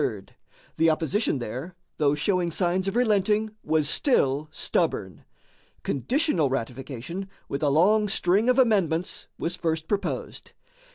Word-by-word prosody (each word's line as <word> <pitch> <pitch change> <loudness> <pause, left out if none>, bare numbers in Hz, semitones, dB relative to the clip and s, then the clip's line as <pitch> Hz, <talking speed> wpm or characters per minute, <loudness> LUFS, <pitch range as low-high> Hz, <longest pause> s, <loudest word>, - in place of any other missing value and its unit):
The 165 +1 +4
opposition 160 +3 0
there, 130 +9 -6 0.2
though 145 -1 +2
showing 180 +3 0
signs 180 +2 0
of 195 - -2
relenting, 215 -2 +2
was 155 -2 +1
still 145 - +2
stubborn. 100 - -2 0.6
Conditional 210 - +1
ratification, 135 +8 -5 0.2
with 140 - -4
a 150 - +2
long 205 +9 +4
string 195 +4 +2
of 250 - +3
amendments, 190 - +1
was 170 +2 -2
first 160 -2 -2
proposed. 200 -2 -4
170 Hz, 120 wpm, -26 LUFS, 145-205 Hz, 0.6 s, The